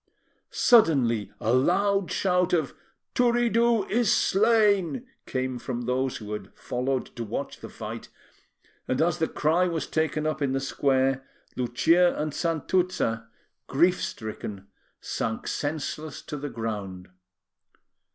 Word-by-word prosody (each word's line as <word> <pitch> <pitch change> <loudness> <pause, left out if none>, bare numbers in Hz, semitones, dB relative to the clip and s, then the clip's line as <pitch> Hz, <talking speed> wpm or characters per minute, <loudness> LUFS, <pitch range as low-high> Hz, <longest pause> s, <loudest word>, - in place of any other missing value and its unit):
Suddenly, 135 - +4
a 115 - +1
loud 195 +8 +2
shout 180 -1 +1
of 160 -6 +1 0.4
"Turiddu 235 -3 +3
is 230 -1 +2
slain!" 215 +1 +3 0.2
came 130 -1 -2
from 120 -1 -4
those 130 +2 -1
who 105 -1 -7
had 100 -2 -6
followed 125 +1 -3
to 120 - -4
watch 105 - -5
the - - -9
fight, - - -7 0.8
and 130 - 0
as 170 +1 +2
the 160 - +2
cry 165 +4 +2
was 165 -3 -2
taken 155 -1 -1
up 155 -1 -1
in 135 -2 +1
the 135 - +1
square, 135 -1 +1 0.3
Lucia 165 +9 +3
and 150 -1 -2
Santuzza, 165 -8 0 0.4
grief 175 +6 +3
stricken, 105 -3 -5 0.3
sank 110 0 -3
senseless 155 0 -3
to - - -6
the 145 +1 -5
ground. 100 -6 -5
150 Hz, 125 wpm, -26 LUFS, 125-180 Hz, 0.8 s, Suddenly